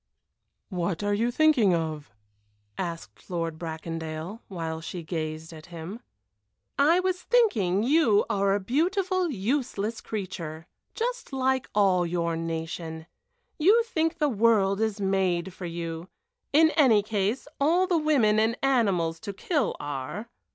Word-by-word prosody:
"What 180 Hz, -1 st, -2 dB
are 205 Hz, 0 st, +1 dB
you 225 Hz, +4 st, +1 dB
thinking 245 Hz, -, +4 dB
of?" 155 Hz, -4 st, -3 dB, 0.7 s
asked 170 Hz, -2 st, -6 dB
Lord 165 Hz, -3 st, -3 dB
Bracondale, 165 Hz, +3 st, -5 dB
while 165 Hz, -4 st, -4 dB
she 170 Hz, +1 st, -6 dB
gazed 160 Hz, 0 st, -4 dB
at 155 Hz, -1 st, -12 dB
him. 175 Hz, +5 st, -7 dB, 0.8 s
"I 320 Hz, +5 st, +5 dB
was 365 Hz, 0 st, -1 dB
thinking 215 Hz, -, +2 dB
you 245 Hz, -6 st, +4 dB
are 200 Hz, 0 st, +2 dB
a -, -, 0 dB
beautiful, 360 Hz, -, 0 dB
useless 230 Hz, -2 st, -2 dB
creature. 175 Hz, -6 st, -5 dB, 0.3 s
Just -, -, -3 dB
like 265 Hz, -1 st, 0 dB
all 190 Hz, -3 st, +4 dB
your 170 Hz, -1 st, -1 dB
nation. 165 Hz, 0 st, -4 dB, 0.5 s
You 415 Hz, +9 st, +5 dB
think 325 Hz, -7 st, -1 dB
the 300 Hz, -4 st, +2 dB
world 215 Hz, -4 st, +3 dB
is 220 Hz, -1 st, 0 dB
made 190 Hz, -2 st, 0 dB
for 185 Hz, -1 st, -6 dB
you; 165 Hz, 0 st, -5 dB, 0.4 s
in 315 Hz, +2 st, +5 dB
any 245 Hz, -11 st, +4 dB
case, 210 Hz, +5 st, -1 dB
all 335 Hz, +6 st, +3 dB
the 355 Hz, -3 st, +2 dB
women 255 Hz, -9 st, +3 dB
and 225 Hz, +2 st, +2 dB
animals 195 Hz, -11 st, +2 dB
to 200 Hz, +1 st, -6 dB
kill 290 Hz, -, -1 dB
are." 145 Hz, -, -5 dB
200 Hz, 135 wpm, -27 LUFS, 170-270 Hz, 0.8 s, I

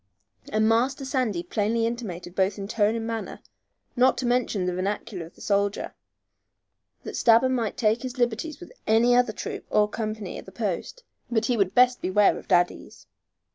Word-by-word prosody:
and 215 Hz, +1 st, +2 dB
Master 255 Hz, +5 st, +1 dB
Sandy 250 Hz, -, -1 dB
plainly 225 Hz, +4 st, 0 dB
intimated 195 Hz, -7 st, -5 dB
both 190 Hz, +2 st, +1 dB
in 195 Hz, -1 st, -5 dB
tone 210 Hz, +1 st, +1 dB
and 225 Hz, -1 st, -3 dB
manner, 225 Hz, -1 st, -4 dB, 0.6 s
not 255 Hz, +1 st, +4 dB
to 255 Hz, -, -2 dB
mention 240 Hz, -6 st, +1 dB
the 180 Hz, -, -1 dB
vernacular 190 Hz, -1 st, -3 dB
of -, -, -20 dB
the -, -, -17 dB
soldier, 200 Hz, 0 st, 0 dB, 1.1 s
that -, -, -6 dB
Stabber 235 Hz, +2 st, +5 dB
might 235 Hz, -5 st, -1 dB
take 225 Hz, 0 st, +1 dB
liberties 240 Hz, +6 st, -1 dB
with -, -, -11 dB, 0.2 s
any 230 Hz, +3 st, +4 dB
other 245 Hz, -2 st, +3 dB
troop -, -, -6 dB
or 210 Hz, 0 st, +3 dB
company 215 Hz, -3 st, -5 dB
at -, -, -13 dB
the -, -, -10 dB
post, 210 Hz, -, -4 dB, 0.3 s
but 225 Hz, -2 st, +1 dB
would 200 Hz, -5 st, +1 dB
best 250 Hz, 0 st, +4 dB
beware 200 Hz, +2 st, +3 dB
of -, -, -15 dB
Daddy's. 175 Hz, 0 st, 0 dB
220 Hz, 170 wpm, -25 LUFS, 200-240 Hz, 1.1 s, Stabber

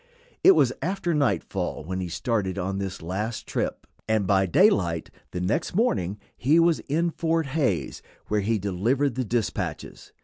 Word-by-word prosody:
It 385 Hz, -, +9 dB
was 125 Hz, -1 st, +3 dB
after 180 Hz, +2 st, -1 dB
nightfall 125 Hz, -, -1 dB
when 95 Hz, +4 st, -4 dB
he 90 Hz, -2 st, -3 dB
started 100 Hz, 0 st, -1 dB
on 95 Hz, +1 st, -2 dB
this 95 Hz, -3 st, -5 dB
last 105 Hz, +7 st, -3 dB
trip, -, -, -3 dB, 0.2 s
and 110 Hz, -2 st, +2 dB
by 95 Hz, 0 st, +3 dB
daylight 90 Hz, -, +3 dB, 0.2 s
the 90 Hz, -, -5 dB
next 90 Hz, -, -1 dB
morning 105 Hz, -, +1 dB, 0.2 s
he 150 Hz, +7 st, +3 dB
was 170 Hz, -1 st, +4 dB
in 165 Hz, +4 st, +1 dB
Fort 165 Hz, 0 st, 0 dB
Hays, 140 Hz, 0 st, -1 dB, 0.2 s
where 105 Hz, 0 st, 0 dB
he 110 Hz, +3 st, +1 dB
delivered 115 Hz, +9 st, 0 dB
the 130 Hz, +2 st, -1 dB
dispatches. 115 Hz, -1 st, -3 dB
110 Hz, 160 wpm, -25 LUFS, 95-150 Hz, 0.2 s, It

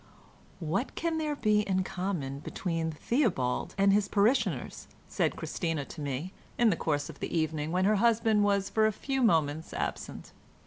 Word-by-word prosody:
"What 185 Hz, -, -2 dB
can 330 Hz, -1 st, -1 dB
there 305 Hz, -2 st, -1 dB
be 215 Hz, -5 st, +2 dB
in 190 Hz, -2 st, 0 dB
common 180 Hz, -8 st, -3 dB
between 165 Hz, +1 st, -3 dB
Theobald 160 Hz, -, 0 dB
and 195 Hz, 0 st, +4 dB
his 205 Hz, 0 st, +3 dB
parishioners?" 215 Hz, +6 st, +1 dB, 0.2 s
said -, -, 0 dB
Christina 165 Hz, -5 st, -3 dB
to 155 Hz, -, -9 dB
me, 145 Hz, +6 st, -4 dB, 0.2 s
in 235 Hz, -2 st, +4 dB
the -, -, +1 dB
course 145 Hz, -3 st, -1 dB
of -, -, -10 dB
the -, -, -2 dB
evening, 155 Hz, -1 st, -1 dB
when 185 Hz, +2 st, +2 dB
her 210 Hz, +1 st, +4 dB
husband 220 Hz, -1 st, +3 dB
was 200 Hz, -1 st, +2 dB
for 215 Hz, +2 st, +3 dB
a -, -, +1 dB
few 270 Hz, +5 st, -2 dB
moments 160 Hz, -, +1 dB
absent. -, -, -4 dB
195 Hz, 170 wpm, -29 LUFS, 160-215 Hz, 0.2 s, and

